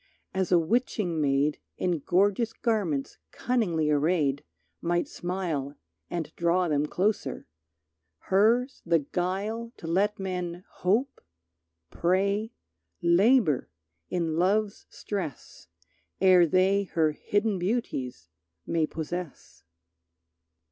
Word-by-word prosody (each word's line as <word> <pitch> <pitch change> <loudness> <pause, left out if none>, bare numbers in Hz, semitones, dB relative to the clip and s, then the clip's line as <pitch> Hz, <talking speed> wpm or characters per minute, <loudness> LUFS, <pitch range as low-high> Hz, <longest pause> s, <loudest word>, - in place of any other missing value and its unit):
As 190 -1 -1
a 180 - +6
witching 175 -2 0
maid 145 +1 +1 0.2
In 175 -3 0
gorgeous 200 - +2
garments 195 - -1
cunningly 175 -11 0
arrayed 150 -2 +1 0.4
Might 175 0 0
smile 170 -6 -3 0.3
and 165 -2 -4
draw 175 +1 +2
them 150 -1 +1
closer, 185 - -1 0.9
hers 230 +7 +3
the 170 0 +3
guile 195 - -3
To - - -10
let 195 +5 +1
men 180 -2 -4
hope, 225 +9 -1 0.7
pray, 200 +5 +1 0.5
labor 180 - +4 0.4
in 165 -3 -1
love's 200 +4 +1
stress 180 - -6 0.5
Ere 185 -2 +6
they 190 +4 +3
her 160 -2 +3
hidden 205 +5 -1
beauties 155 - -2 0.4
may 165 -2 +1
possess. 165 +1 -6
180 Hz, 100 wpm, -27 LUFS, 160-205 Hz, 0.9 s, a